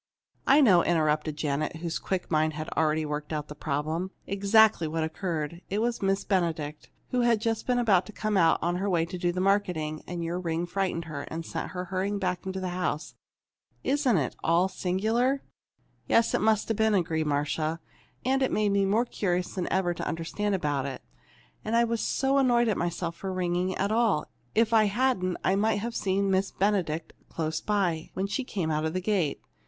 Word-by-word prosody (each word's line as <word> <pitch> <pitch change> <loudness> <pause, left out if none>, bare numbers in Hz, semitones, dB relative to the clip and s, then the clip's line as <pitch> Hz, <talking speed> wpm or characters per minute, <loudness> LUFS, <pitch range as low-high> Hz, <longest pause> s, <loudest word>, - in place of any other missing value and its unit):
"I 280 +3 +7
know," 185 -10 +6
interrupted 155 -2 +1
Janet, 150 +1 -1
whose 165 0 -3
quick 185 -3 -3
mind 155 0 +2
had 155 +1 -5
already 155 0 +1
worked 150 0 -4
out 150 -1 -3
the - - -6
problem, 155 +5 -2 0.2
"exactly 200 -2 +4
what 160 +1 -1
occurred. 165 0 -3
It 200 - -1
was 230 +2 0
Miss 195 0 +1
Benedict, 160 -6 -1 0.2
who 250 - +2
had 235 -1 +4
been - - -10
just 225 +1 -1
about 230 -7 +3
to - - -8
come 215 0 -2
out 165 -4 +5
on 175 +1 0
her 200 +2 -1
way 170 -3 +2
to 180 +2 -6
do 175 0 +1
the 180 - -3
marketing. 180 -6 0
And 175 -1 -4
your 170 +2 -2
ring 170 -1 -1
frightened 180 -2 -2
her, 150 -3 -5
and 165 +1 -5
sent 165 - -5
her 180 0 -4
hurrying 190 +3 -1
back 185 -1 -2
into 190 0 -3
the 185 -1 -3
house. 175 -3 -2 0.7
Isn't 270 -6 +2
it 135 -5 -1
all 170 +3 +3
singular!" 220 +9 0 0.6
"Yes, 230 0 +4
that - - +1
must 220 0 +2
have 225 - 0
been 220 -1 +3
it," 190 - +4
agreed 160 -2 -1
Marcia. 150 +2 -1 0.5
"And 265 +1 +2
it 265 - +2
made 210 -1 +2
me 200 0 +2
more 215 +5 +2
curious 180 -6 -1
than 185 -2 -3
ever 175 -2 +1
to - - -5
understand 195 +5 -1
about 145 -6 -1
it. 135 -2 -7 0.6
And 220 +2 -1
I 235 - +5
was 230 -1 -1
so 270 +1 +1
annoyed 240 -3 +3
at 210 - +1
myself 170 0 -2
for 195 - -4
ringing 180 0 -1
at 200 +2 0
all. 220 -8 +2 0.3
If 225 +1 +3
I 220 -1 +6
hadn't, 205 -4 +1
I 190 - +3
might 215 +2 +2
have 230 +3 -3
seen 195 0 +1
Miss 190 +1 +2
Benedict 180 -6 -1 0.2
close 160 -1 -2
by, 185 -6 0
when 190 - -1
she 205 +7 -2
came 185 -10 -2
out 155 0 0
of 160 - -1
the 185 - 0
gate. 185 -6 0
185 Hz, 205 wpm, -28 LUFS, 160-210 Hz, 0.7 s, I